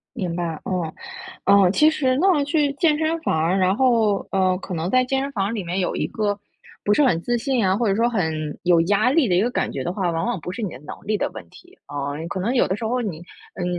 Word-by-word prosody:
明 185 Hz, -8 st, -3 dB
白， 165 Hz, -3 st, -3 dB
嗯， 175 Hz, -4 st, -2 dB, 0.5 s
嗯。 200 Hz, -2 st, +5 dB
其 305 Hz, +6 st, +5 dB
实 260 Hz, -5 st, +1 dB
那 350 Hz, -5 st, +3 dB
去 290 Hz, -1 st, +1 dB
健 300 Hz, 0 st, +2 dB
身 320 Hz, +1 st, 0 dB
房 320 Hz, -, -1 dB
儿， 170 Hz, +4 st, +1 dB
然 185 Hz, +1 st, +3 dB
后， 225 Hz, -6 st, +2 dB
呃， 185 Hz, -1 st, +2 dB
可 185 Hz, -1 st, -6 dB
能 165 Hz, +2 st, -2 dB
在 255 Hz, +2 st, +3 dB
健 265 Hz, +1 st, 0 dB
身 280 Hz, -, -3 dB
房 205 Hz, -1 st, -1 dB
里 205 Hz, -, -3 dB
面 175 Hz, +3 st, -2 dB
有 180 Hz, -, -1 dB
一 -, -, -1 dB
个 205 Hz, -2 st, -1 dB, 0.5 s
不 205 Hz, -, +2 dB
是 295 Hz, -, +4 dB
很 185 Hz, -, +3 dB
自 240 Hz, 0 st, 0 dB
信 245 Hz, -4 st, 0 dB
啊， 185 Hz, -, +2 dB
或 230 Hz, +1 st, 0 dB
者 195 Hz, -, +2 dB
说 230 Hz, +2 st, +2 dB
很 160 Hz, -9 st, -2 dB
有 175 Hz, -2 st, +4 dB
压 205 Hz, +7 st, +2 dB
力 280 Hz, -6 st, +3 dB
的 180 Hz, -, +2 dB
一 175 Hz, -, +4 dB
个 235 Hz, +4 st, +1 dB
感 -, -, -1 dB
觉 135 Hz, -, -4 dB
的 175 Hz, -, -2 dB
话， 185 Hz, -3 st, -1 dB
往 165 Hz, +3 st, -2 dB
往 240 Hz, -4 st, -1 dB
不 180 Hz, -, -6 dB
是 220 Hz, -, -6 dB
你 205 Hz, -, -2 dB
的 125 Hz, -, -9 dB
能 150 Hz, -, -8 dB
力 215 Hz, 0 st, 0 dB
的 -, -, -2 dB
问 -, -, -9 dB
题。 360 Hz, +2 st, -18 dB
嗯， 145 Hz, +1 st, -3 dB
嗯， 165 Hz, -, -5 dB
可 190 Hz, -, -4 dB
能 230 Hz, +8 st, -1 dB
有 245 Hz, -, +3 dB
的 190 Hz, -, -1 dB
时 225 Hz, -, -6 dB
候 245 Hz, +3 st, 0 dB
你， 195 Hz, -9 st, -4 dB, 0.4 s
嗯， 180 Hz, -, -4 dB
200 Hz, 290 characters per minute, -22 LUFS, 180-255 Hz, 0.5 s, 嗯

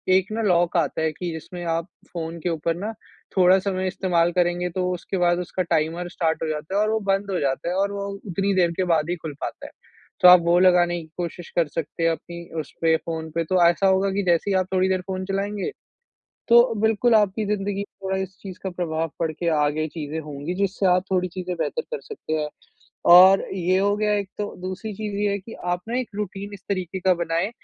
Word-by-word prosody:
एक 190 Hz, +2 st, +1 dB
ना 225 Hz, +1 st, -2 dB
लॉक 175 Hz, -3 st, +2 dB
आता 165 Hz, -1 st, 0 dB
है 160 Hz, 0 st, +1 dB
कि 175 Hz, +2 st, -4 dB
जिसमें 175 Hz, +2 st, -7 dB
आप 165 Hz, +1 st, -1 dB, 0.3 s
फ़ोन 165 Hz, -1 st, -5 dB
के 175 Hz, -, -1 dB
ऊपर 165 Hz, 0 st, -1 dB
ना 205 Hz, +6 st, -4 dB, 0.5 s
थोड़ा 185 Hz, +1 st, +6 dB
समय 190 Hz, -1 st, -2 dB
इस्तेमाल 175 Hz, -2 st, +1 dB
करेंगे, 175 Hz, 0 st, +1 dB
तो 180 Hz, +1 st, -1 dB
उसके 180 Hz, +2 st, -4 dB
बाद 175 Hz, -1 st, +2 dB
उसका 180 Hz, +1 st, -2 dB
टाइमर 170 Hz, +1 st, -1 dB
स्टार्ट 165 Hz, -3 st, -1 dB
हो -, -, -1 dB
जाता 155 Hz, +4 st, -4 dB
है 205 Hz, -, +3 dB
और 215 Hz, -, +2 dB
वो 220 Hz, -, +1 dB
बंद 195 Hz, +1 st, -1 dB
हो 180 Hz, -, 0 dB
जाता 135 Hz, +4 st, -1 dB
है 180 Hz, -, -1 dB
और 200 Hz, +1 st, +1 dB
वो 200 Hz, 0 st, -4 dB, 0.2 s
उतनी 195 Hz, +2 st, 0 dB
देर 175 Hz, -2 st, +3 dB
के 185 Hz, -, +2 dB
बाद 160 Hz, 0 st, +1 dB
ही 175 Hz, -, 0 dB
खुल 160 Hz, -2 st, -6 dB
पाता -, -, -5 dB
है। -, -, -14 dB, 0.5 s
तो -, -, +9 dB
आप 180 Hz, 0 st, +10 dB
वो 170 Hz, +1 st, +4 dB
लगाने 175 Hz, -2 st, +4 dB
की 160 Hz, -, -14 dB
कोशिश 175 Hz, -1 st, -5 dB
कर 170 Hz, -2 st, +3 dB
सकते 160 Hz, +2 st, -4 dB
हैं 165 Hz, -, +4 dB
अपनी 170 Hz, +1 st, -7 dB, 0.2 s
उसपे 160 Hz, +2 st, 0 dB
फ़ोन 160 Hz, -1 st, -5 dB
पे। 165 Hz, -, +1 dB
तो 180 Hz, +2 st, +3 dB
ऐसा 195 Hz, +3 st, +2 dB
होगा 190 Hz, +1 st, +3 dB
कि 200 Hz, +1 st, 0 dB
जैसे 175 Hz, +2 st, +2 dB
ही -, -, +2 dB
आप 185 Hz, -1 st, 0 dB
थोड़ी 185 Hz, 0 st, +2 dB
देर 185 Hz, -1 st, +1 dB
फ़ोन 185 Hz, -1 st, -3 dB
चलाएँगे 200 Hz, -, -2 dB, 0.8 s
तो 235 Hz, 0 st, +6 dB
बिल्कुल 225 Hz, +2 st, +3 dB
आपकी 210 Hz, 0 st, +3 dB
ज़िंदगी 200 Hz, -1 st, -1 dB
में -, -, -2 dB, 0.2 s
थोड़ा 190 Hz, 0 st, -1 dB
इस 190 Hz, 0 st, -5 dB
चीज़ 190 Hz, -2 st, -8 dB
का 190 Hz, -, -3 dB
प्रभाव 165 Hz, -2 st, -2 dB
पड़ 165 Hz, -1 st, +1 dB
के 170 Hz, +2 st, -3 dB
आगे 150 Hz, +1 st, +1 dB
चीज़ें 155 Hz, 0 st, -5 dB
होंगी 150 Hz, +2 st, -5 dB
जिससे 195 Hz, 0 st, 0 dB
आप 180 Hz, 0 st, +3 dB
थोड़ी 185 Hz, -1 st, +1 dB
चीज़ें 180 Hz, 0 st, -5 dB
बेहतर 475 Hz, -, -2 dB
कर 475 Hz, 0 st, -6 dB
सकते 435 Hz, -, -8 dB
हैं। 150 Hz, -1 st, -1 dB, 0.7 s
और 190 Hz, +2 st, +8 dB
ये 185 Hz, +1 st, +2 dB
हो 200 Hz, +1 st, +2 dB
गया 210 Hz, 0 st, +1 dB
एक 200 Hz, -1 st, -3 dB
तो। 205 Hz, 0 st, -3 dB
दूसरी 190 Hz, +4 st, -5 dB
चीज़ 210 Hz, 0 st, -5 dB
ये 205 Hz, 0 st, +1 dB
है 200 Hz, -, -1 dB
कि 225 Hz, +4 st, -11 dB, 0.2 s
आपने 225 Hz, +8 st, -2 dB
एक 255 Hz, -, -5 dB
रूटीन 200 Hz, 0 st, -5 dB
इस 200 Hz, -, -11 dB
तरीके 185 Hz, -1 st, -2 dB
का 185 Hz, 0 st, +3 dB
बनाएँ 170 Hz, +3 st, -1 dB
180 Hz, 230 wpm, -23 LUFS, 170-195 Hz, 0.8 s, आप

